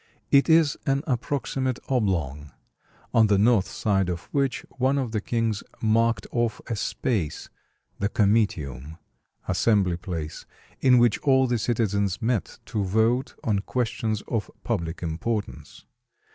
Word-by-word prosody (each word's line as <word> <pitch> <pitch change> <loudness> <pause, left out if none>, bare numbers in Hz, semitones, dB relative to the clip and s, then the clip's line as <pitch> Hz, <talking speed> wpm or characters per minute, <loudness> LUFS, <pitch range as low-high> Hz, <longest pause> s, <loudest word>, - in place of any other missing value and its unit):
It 140 +3 +5
is 160 -3 +4
an 135 +1 +1
approximate 130 -1 -1
oblong, 85 - -1 0.6
on 110 -1 +5
the 100 -1 +3
north 105 -1 +4
side 95 -3 0
of 85 -1 -3
which 140 -2 0
one 130 +2 +2
of 130 -5 -1
the 110 -2 -1
kings 115 -2 -1 0.2
marked 115 -1 +2
off 120 -2 0
a 115 - -3
space, 100 - -2 0.5
the 100 - 0
comitium 80 - 0 0.5
(assembly 100 -6 +2
place), 85 -4 -6 0.3
in 125 -1 +5
which 120 -2 +4
all 130 -2 +4
the 120 -2 0
citizens 105 -4 0
met 115 -1 -1
to 110 -3 -2
vote 110 +7 +1
on 105 -3 +1
questions 110 -1 -2
of 110 -3 -2
public 85 +1 -3
importance. 100 +7 -4
110 Hz, 130 wpm, -25 LUFS, 95-125 Hz, 0.6 s, It